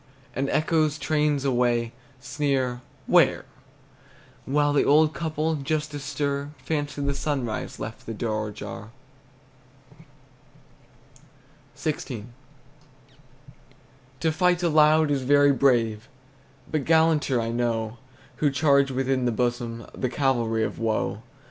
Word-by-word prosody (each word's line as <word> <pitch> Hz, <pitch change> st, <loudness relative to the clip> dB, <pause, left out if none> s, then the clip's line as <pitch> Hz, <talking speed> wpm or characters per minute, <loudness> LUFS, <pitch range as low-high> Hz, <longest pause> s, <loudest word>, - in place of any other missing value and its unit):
And 135 Hz, +1 st, -1 dB
echoes, 155 Hz, -1 st, +1 dB
trains 150 Hz, 0 st, 0 dB
away, 120 Hz, -3 st, +1 dB, 0.3 s
Sneer 135 Hz, -3 st, -1 dB, 0.2 s
"Where?" -, -, +3 dB, 1.0 s
While 145 Hz, +1 st, +2 dB
the 145 Hz, -, +3 dB
old 155 Hz, +2 st, +4 dB
couple, 160 Hz, -1 st, -1 dB
just 150 Hz, +1 st, -2 dB
astir, 145 Hz, 0 st, -3 dB
Fancy 145 Hz, -1 st, -3 dB
the 140 Hz, 0 st, 0 dB
sunrise 135 Hz, -5 st, -3 dB
left 110 Hz, -, -7 dB
the 115 Hz, -, -4 dB
door 110 Hz, -1 st, -2 dB
ajar! 105 Hz, +1 st, -8 dB, 2.9 s
XVI. 130 Hz, -8 st, -4 dB, 2.0 s
To 160 Hz, -, +2 dB
fight 180 Hz, +1 st, +2 dB
aloud 155 Hz, -1 st, +4 dB
is 140 Hz, -2 st, +1 dB
very 145 Hz, +2 st, +4 dB
brave, 120 Hz, -3 st, +1 dB, 0.6 s
But 155 Hz, -3 st, 0 dB
gallanter, 160 Hz, -5 st, +3 dB
I 115 Hz, 0 st, -2 dB
know, 115 Hz, -1 st, -2 dB, 0.4 s
Who 150 Hz, -, +2 dB
charge 140 Hz, 0 st, +3 dB
within 130 Hz, -1 st, 0 dB
the 120 Hz, -, +2 dB
bosom, 120 Hz, 0 st, -2 dB
The 130 Hz, -, -2 dB
cavalry 120 Hz, -5 st, 0 dB
of -, -, -4 dB
woe. 110 Hz, -1 st, -1 dB
140 Hz, 110 wpm, -25 LUFS, 120-150 Hz, 2.9 s, old